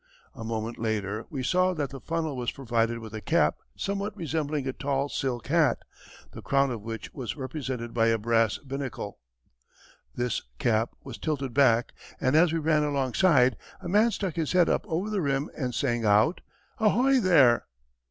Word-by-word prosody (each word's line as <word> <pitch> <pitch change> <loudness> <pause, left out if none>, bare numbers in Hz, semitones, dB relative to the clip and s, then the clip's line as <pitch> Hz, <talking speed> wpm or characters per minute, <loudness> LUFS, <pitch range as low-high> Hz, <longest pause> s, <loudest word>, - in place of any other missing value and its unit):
A 115 - -8
moment 115 +1 -4
later 110 -1 -2
we 135 -3 -4
saw 185 +5 +2
that 145 -4 -2
the 135 - -7
funnel 165 -3 -2
was 125 -2 -2
provided 115 -3 -1
with 110 -2 -9
a 110 - -5
cap 165 +5 +2 0.2
somewhat 200 +1 -3
resembling 155 -4 -2
a 130 - -2
tall 140 +1 -1
silk 125 -6 -2
hat, - - +3 0.5
the - - -9
crown 135 -1 +2
of 115 -3 -4
which 115 0 -7
was 120 -7 -5
represented 130 -3 -5
by 115 -1 +3
a 115 0 +3
brass 115 -1 +2
binnacle. 135 -6 -6 1.0
This 120 -2 -1 0.2
cap 110 - +1
was 130 -4 -8
tilted 140 -5 -2
back, 120 -4 +4 0.3
and 130 +3 +1
as 160 +1 +5
we 165 - 0
ran 155 -1 +2
alongside, 135 - +3 0.2
a - - -8
man 210 +6 +4
stuck 195 -6 -3
his 160 -1 -1
head 180 -2 +4
up - - 0
over 185 +4 -2
the 205 -3 0
rim 140 0 -1
and 125 -4 -3
sang 120 -4 0
out, 105 - +3 0.4
"Ahoy 250 +5 +4
there!" 150 - +4
135 Hz, 175 wpm, -27 LUFS, 115-160 Hz, 1.0 s, as